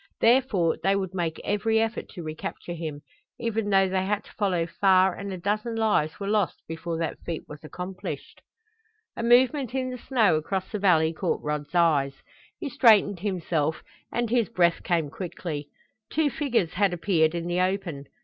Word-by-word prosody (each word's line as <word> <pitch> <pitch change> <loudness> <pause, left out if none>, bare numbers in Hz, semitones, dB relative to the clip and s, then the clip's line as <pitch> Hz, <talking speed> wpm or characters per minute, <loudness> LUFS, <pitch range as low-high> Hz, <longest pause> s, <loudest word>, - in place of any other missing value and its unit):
Therefore 230 -9 +3
they 195 +1 +2
would 190 -2 -2
make 170 -3 -2
every 220 +2 +1
effort 225 +1 -2
to 175 - -8
recapture 155 +2 -6
him, 160 -3 -5 0.4
even 225 -3 -1
though 195 -1 +4
they 185 0 0
had 205 +1 -1
to - - -17
follow 185 -5 0
far 190 +1 +3
and 200 +1 -6
a 185 - -4
dozen 210 +5 -1
lives 210 -9 +1
were 200 - -4
lost 205 -5 0
before 165 +1 -4
that 165 -1 -3
feat 165 -2 -5
was 150 +1 -11
accomplished. 180 +4 -7 0.7
A - - -4
movement 250 +2 +3
in 255 -1 -1
the 250 - -6
snow 225 - +3
across 190 +4 -2
the 210 - -2
valley 165 -5 +3
caught - - -2
Rod's 150 +2 -3
eyes. 145 -5 +3 0.4
He 325 - -4
straightened 215 -7 +4
himself, 170 -5 -1 0.3
and 240 -2 -1
his 235 -3 +2
breath 175 -6 +2
came 165 -5 0
quickly. 160 -4 -5 0.4
Two 305 -2 +2
figures 245 - 0
had 195 -1 +2
appeared 170 -3 +2
in 170 -1 -3
the 175 +1 -1
open. 185 -6 -2
190 Hz, 175 wpm, -26 LUFS, 165-215 Hz, 0.7 s, though